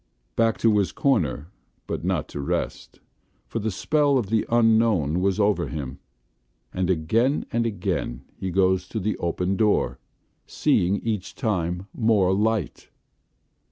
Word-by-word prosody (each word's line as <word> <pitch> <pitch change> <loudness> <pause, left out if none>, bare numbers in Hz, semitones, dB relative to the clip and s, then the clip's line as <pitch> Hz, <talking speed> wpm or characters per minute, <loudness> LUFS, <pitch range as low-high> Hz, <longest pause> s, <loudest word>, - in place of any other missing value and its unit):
Back 115 -1 +2
to 110 -2 +4
his 100 - 0
corner 85 - 0 0.3
but - - -4
not - - -1
to - - -6
rest, 70 - -3 0.5
for 115 - -4
the 110 +1 -1
spell 145 +7 +2
of 110 -5 -2
the 110 -1 +1
Unknown 110 -9 +3
was 95 +2 +1
over 100 -4 +2
him, 70 -4 -6 0.7
and 90 -1 -1
again 110 - +1
and 115 0 +1
again 90 - -3
he 95 - -4
goes 95 0 +2
to 110 - -3
the 105 +2 -1
open 90 +3 -1
door, 100 - +1 0.5
seeing 90 +3 +2
each 110 -5 -3
time 90 -6 -1
more 105 -5 +3
Light. 105 -4 -1
100 Hz, 140 wpm, -24 LUFS, 90-115 Hz, 0.7 s, to